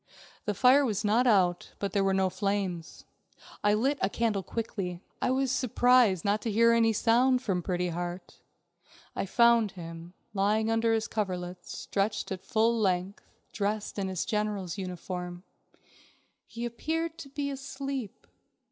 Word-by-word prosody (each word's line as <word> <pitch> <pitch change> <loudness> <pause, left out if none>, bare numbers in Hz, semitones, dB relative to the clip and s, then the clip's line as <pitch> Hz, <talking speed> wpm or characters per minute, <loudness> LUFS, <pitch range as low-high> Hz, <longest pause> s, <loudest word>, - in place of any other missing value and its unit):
The 210 - -1
fire 260 +6 +6
was 215 -4 -1
not 230 +5 +3
out, 180 -6 +2
but 200 -2 -3
there 200 0 +1
were 195 - +2
no 190 -1 +2
flames. 190 -4 -3 0.6
I 205 0 +4
lit 270 +6 +1
a 190 - +2
candle 220 -3 0
quickly. 190 -5 -4 0.2
I - - +1
was 260 0 +1
surprised 245 -7 +3
not 205 +1 +1
to 225 - -2
hear 230 +2 +5
any 230 -1 +4
sound 250 +4 +3
from 185 -6 0
Pretty 180 0 -1
Heart. 175 +1 -6 0.8
I - - -2
found 235 -1 +4
him, 165 0 -9 0.2
lying 215 +2 +1
under 225 0 +2
his 225 -1 +1
coverlets, 180 -4 -4
stretched 200 +1 -2
out 190 - -3
his - - -27
full 230 +1 +2
length, 190 -1 -1 0.2
dressed 210 0 -2
in 195 - -1
his 185 -2 -2
general's 210 -4 -2
uniform. 180 -1 -6 1.0
He 235 +1 -5
appeared 320 +7 -3
to 275 - -9
be 280 +1 -3
asleep. 275 -4 -5
210 Hz, 155 wpm, -29 LUFS, 185-235 Hz, 1.0 s, fire